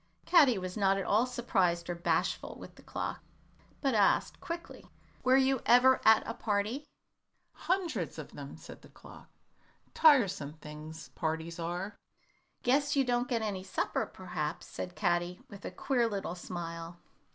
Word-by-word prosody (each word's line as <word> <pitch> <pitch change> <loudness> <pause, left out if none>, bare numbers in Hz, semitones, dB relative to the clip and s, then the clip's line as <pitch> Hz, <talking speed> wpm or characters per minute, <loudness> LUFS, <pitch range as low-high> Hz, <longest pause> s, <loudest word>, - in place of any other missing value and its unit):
Caddy 275 - +6
was 185 -1 -5
not 195 -2 +3
at 195 - -2
all 225 +5 +3
surprised 185 -9 0
or 175 - -1
bashful 170 +2 -1
with - - -10
the - - -17
clock, - - -4 0.6
but 270 -3 +1
asked, 205 -3 +2
quickly, 340 0 -7 0.3
"Were 255 +1 +5
you 265 -1 +3
ever 250 +2 +6
at 220 0 +6
a 230 - -2
party?" 220 +7 -1 0.7
"Hundreds 370 -2 -2
of - - -8
them," - - -9
said - - -12
the - - -16
clock. - - -14 0.6
"Tiresome 205 - +4
things, 155 +1 -10
parties 160 +1 -3
are." 175 +5 -4 0.6
"Guess 285 +4 +2
you 275 - +4
don't 245 0 +1
get 230 -3 0
any 200 -3 -2
supper, 190 - -1
perhaps," 155 -3 -4
said 180 0 -6
Caddy, 175 +1 0
with 200 0 -10
a - - -2
queer 245 -4 0
little 200 -5 -3
smile. 170 -1 -6
200 Hz, 150 wpm, -31 LUFS, 175-250 Hz, 0.7 s, Caddy